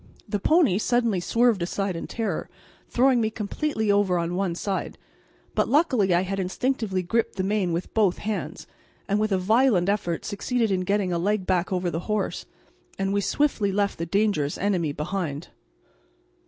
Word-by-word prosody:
The 205 -1 -2
pony 300 - +3
suddenly 230 -4 +1
swerved 230 +2 +2
aside 190 +2 -2
in 165 - -5
terror, 215 -8 -3 0.4
throwing 250 -1 +3
me 220 - +1
completely 220 +1 -1
over 200 -3 +2
on 170 0 -1
one 180 -2 -1
side, 195 +2 -3 0.6
but - - +1
luckily 260 - +3
I 175 0 +4
had 195 +1 -3
instinctively 190 0 -1
gripped 225 +6 0
the 185 - -1
mane 195 -2 0
with 170 +2 -3
both 205 -5 +2
hands, 215 0 -4 0.4
and 205 +1 +1
with 215 0 0
a 190 - +3
violent 205 -1 +3
effort 185 -5 -1
succeeded 225 +2 -1
in 185 -1 +1
getting 195 -2 +1
a 170 - 0
leg 200 +2 0
back 180 -1 0
over 180 -1 0
the 165 - -2
horse, 210 -2 -2 0.5
and 195 0 -1
we 200 - +1
swiftly 215 -3 +1
left 200 -2 0
the 165 - -3
dangerous 195 -6 +1
enemy 180 -6 0
behind. 150 0 -4
200 Hz, 170 wpm, -25 LUFS, 180-220 Hz, 0.6 s, I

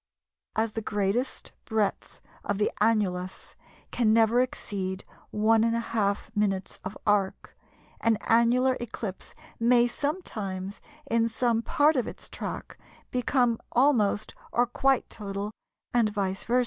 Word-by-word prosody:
As 220 0 +1
the 225 - -3
greatest 210 +4 -1
breadth 220 -4 -1 0.2
of - - -1
the 210 - +1
annulus 190 -4 0 0.4
can 230 -3 +2
never 225 +1 +4
exceed 195 -6 -3 0.3
1½ 225 -1 +1
minutes 195 -2 -1
of 190 +2 -6
arc, 205 -2 0 0.4
an 230 -1 +3
annular 245 +3 +4
eclipse 220 -4 -6 0.2
may 240 +1 +5
sometimes, 210 - -3 0.2
in 230 -3 +2
some 230 0 +1
part 295 +6 +3
of 250 - 0
its - - -9
track, - - -6 0.3
become 245 -2 +2
almost 235 -6 +3 0.2
or 245 - +3
quite 265 +2 +1
total, 200 -1 -5 0.4
and 235 -3 +4
vice 195 -2 -2
versâ. 245 +2 +3
225 Hz, 120 wpm, -27 LUFS, 205-240 Hz, 0.4 s, may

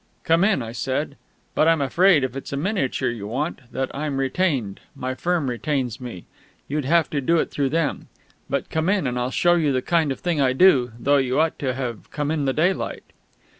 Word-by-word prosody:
"Come 165 +2 +3
in," 195 - +2
I 115 - -6
said. 135 +4 -2 0.4
"But 155 - +3
I'm 165 -1 +4
afraid, 165 +3 +4
if 130 -1 -2
it's 135 - -6
a 140 - -2
miniature 140 - -1
you 105 -4 -6
want, 130 +1 -4
that 130 0 -3
I'm 145 -1 -2
retained 135 - 0 0.2
my 130 -1 -3
firm 170 +1 -1
retains 130 -1 -2
me 115 -9 -8 0.4
you'd 145 -1 -2
have 165 +3 +3
to 145 - -1
do 165 +6 +2
it - - 0
through 140 -2 0
them. 160 0 -1 0.4
But - - -2
come 160 +3 0
in, 195 -5 +1
and 125 -1 -1
I'll 125 +1 -1
show 175 +6 +3
you 160 -4 +2
the 130 -1 0
kind 165 -3 +1
of 135 - -4
thing 170 -5 0
I 130 -2 +3
do 130 -6 +5
though 145 +3 +3
you 130 0 +1
ought 160 0 +1
to 130 -3 -1
have 125 -4 -5
come 145 0 -2
in 150 -3 -1
the 135 - +2
daylight 175 +6 0
140 Hz, 215 wpm, -23 LUFS, 130-165 Hz, 0.4 s, do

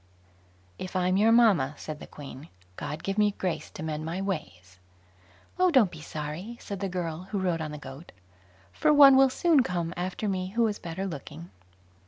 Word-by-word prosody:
"If 185 - -7
I'm 185 0 +2
your 215 +3 +4
mamma", 200 - +4
said 155 -1 -7
the - - -10
Queen, 145 +1 -10 0.3
"God 150 - -6
give 195 +2 -2
me 205 -1 +3
grace 180 -3 -3
to - - -8
mend 155 -1 -3
my 165 +3 -3
ways." 95 - -5 0.8
"Oh, 365 0 +5
don't 255 - +4
be 160 - -10
sorry", 155 +10 -6
said 200 -2 -6
the 195 0 -2
girl, 175 -1 -4
who 205 - -2
rode 180 -4 0
on 155 - -3
the 150 - -6
goat, 135 +3 -11 0.6
"for - - +2
one 280 -2 +9
will 270 0 +6
soon 305 +2 +3
come 175 -6 -2
after 185 +4 -3
me 185 -2 -1
who 235 0 +3
is 210 -2 -2
better 170 +3 -5
looking." 125 - -8
180 Hz, 190 wpm, -27 LUFS, 155-210 Hz, 0.8 s, one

